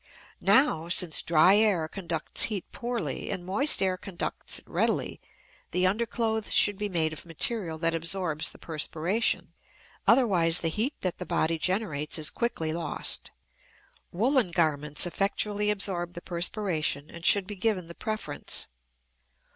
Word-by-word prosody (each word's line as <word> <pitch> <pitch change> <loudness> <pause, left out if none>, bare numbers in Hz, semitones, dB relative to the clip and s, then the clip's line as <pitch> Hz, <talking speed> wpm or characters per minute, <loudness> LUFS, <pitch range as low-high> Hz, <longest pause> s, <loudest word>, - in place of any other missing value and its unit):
Now, 170 - +3
since 175 -2 +4
dry 170 +4 +5
air 200 -7 +2
conducts 170 -3 +1
heat 205 -5 -4
poorly 240 0 -4
and 185 -3 -4
moist 200 +4 +2
air 185 -1 +1
conducts 185 -2 -3
it - - -12
readily, - - -1 0.5
the 180 +1 0
underclothes 220 +2 -1
should 205 -1 +4
be 210 0 -2
made 160 -4 0
of 155 - -8
material 170 +1 -2
that 165 +1 +1
absorbs 165 -1 -1
the - - -12
perspiration; 165 +6 -2 0.5
otherwise 180 -10 +4
the 165 - +1
heat 225 - -1
that 185 -2 -3
the 180 - -5
body 165 -1 0
generates 180 -6 -1
is 155 - -1
quickly 165 -10 -2
lost. 165 -2 -3 0.8
Woolen 240 +3 +3
garments 150 -3 +2
effectually 205 +3 0
absorb 185 -4 -1
the 175 - -7
perspiration 170 -5 -2
and 170 - -10
should 200 +2 +5
be 210 - -6
given 195 -2 -1
the 170 - -8
preference. 215 -8 -2
180 Hz, 140 wpm, -27 LUFS, 165-210 Hz, 0.8 s, dry